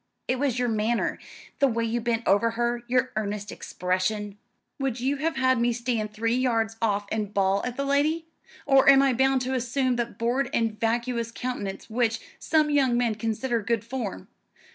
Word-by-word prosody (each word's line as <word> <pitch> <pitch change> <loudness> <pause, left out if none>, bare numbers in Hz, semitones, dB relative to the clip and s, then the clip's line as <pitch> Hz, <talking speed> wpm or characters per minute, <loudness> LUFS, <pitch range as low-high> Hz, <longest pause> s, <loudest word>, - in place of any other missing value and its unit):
"It 255 0 0
was 270 -3 0
your 245 0 +1
manner. 225 +1 0 0.4
The 275 - +5
way 230 -2 0
you 235 +1 -1
bent 230 0 -1
over 205 +4 +4
her, 240 0 0
your 255 +1 +1
earnest 210 -1 -3
expression." 195 +3 -2 0.4
"Would 265 -3 -1
you 270 +3 0
have 320 +2 -1
had 260 -2 +2
me 240 0 +3
stand 230 -3 -2
three 225 +2 -1
yards 230 -3 +1
off 205 -2 +1
and 210 -2 -2
bawl 195 -1 +1
at 250 0 -4
the 280 - -1
lady? 300 +4 +1 0.4
Or 270 -2 +5
am 275 0 +7
I 270 -2 +3
bound 265 +1 +2
to 260 +1 -2
assume 255 0 0
that 235 -1 -3
bored 245 +4 0
and 225 -2 0
vacuous 235 0 -1
countenance 235 -6 -5
which 230 0 0 0.2
some 310 -2 +2
young 265 -4 +3
men 240 -2 +1
consider 225 +2 -1
good 225 0 -1
form? 235 - -5
235 Hz, 185 wpm, -26 LUFS, 220-260 Hz, 0.4 s, am